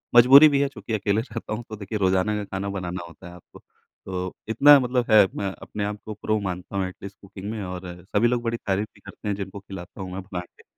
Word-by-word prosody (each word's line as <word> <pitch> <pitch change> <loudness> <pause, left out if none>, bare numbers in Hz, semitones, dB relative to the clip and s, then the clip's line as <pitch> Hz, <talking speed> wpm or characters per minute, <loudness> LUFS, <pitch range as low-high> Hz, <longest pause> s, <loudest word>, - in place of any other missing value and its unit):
मज़बूरी 135 +6 +10
भी 140 -1 +2
है 140 - +2
चूँकि 110 -3 -7
अकेले 105 +1 +1
रहता 115 -2 -6
हूँ 120 +2 -4
तो 110 - -5
देखिए 105 +1 -5
रोज़ाना 95 +2 +2
का 105 - -3
खाना 100 +1 -4
बनाना 90 -2 -4
होता 85 +1 -13
है 90 - -11
आपको। 90 - -16 0.5
तो 90 -1 -4 0.2
इतना 140 +5 +7
मतलब 125 -1 0
है 105 -2 +8
मैं 100 -2 -2
अपने 105 - -5
आपको 105 +1 -5
प्रो 110 +1 -1
मानता 95 0 -5
हूँ 95 -1 0
एटलीस्ट 100 +1 -10
कुकिंग 100 +1 -8
में 110 -3 -4
और 90 0 -6 0.3
सभी 115 +3 +5
लोग 120 0 0
बड़ी 115 0 -1
तारीफ़ 105 -2 -1
भी - - -19
करते 105 - -9
हैं 100 - 0
जिनको 100 0 -6
खिलाता 95 -1 -10
हूँ 90 -1 -6
मैं 95 - -4
बनाके। 90 -2 -8
100 Hz, 235 wpm, -24 LUFS, 95-110 Hz, 0.5 s, मज़बूरी